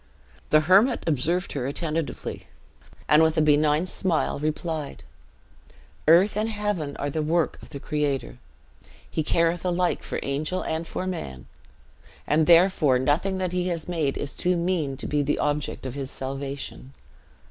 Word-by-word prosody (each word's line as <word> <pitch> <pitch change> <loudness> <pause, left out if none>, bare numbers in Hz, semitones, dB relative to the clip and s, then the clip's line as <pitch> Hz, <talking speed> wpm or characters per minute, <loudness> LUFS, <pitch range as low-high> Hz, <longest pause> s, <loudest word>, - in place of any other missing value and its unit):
The 155 - +5
hermit 190 +10 +4
observed 165 +5 0
her 130 -3 -2
attentively; 155 +2 -3 0.6
and, 150 +1 +6
with 160 0 +3
a - - +4
benign 150 +2 +3
smile, 180 -5 -1
replied, 155 0 -3 1.0
"Earth 180 +6 +6
and 215 +2 0
heaven 205 -9 -2
are 145 0 -2
the 155 - -1
work 160 +2 0
of - - -12
the 140 - -7
Creator. 145 -3 -2 0.7
He - - -2
careth 165 +2 +1
alike 180 0 0
for - - -4
angel 150 +6 -2
and 160 +1 -3
for 185 - -4
man; 70 - -5 0.8
and 155 +1 +2
therefore 170 -6 +5
nothing 150 +9 +1
that 185 -2 -2
he 180 0 -1
has 170 -3 -3
made 160 -6 -1
is 140 - -3
too 180 0 0
mean 170 -6 -1
to - - -5
be 150 0 0
the 145 +1 0
object 145 -2 -2
of 130 - -4
his 135 -1 -5
salvation. 135 0 -6
155 Hz, 155 wpm, -25 LUFS, 145-175 Hz, 1.0 s, and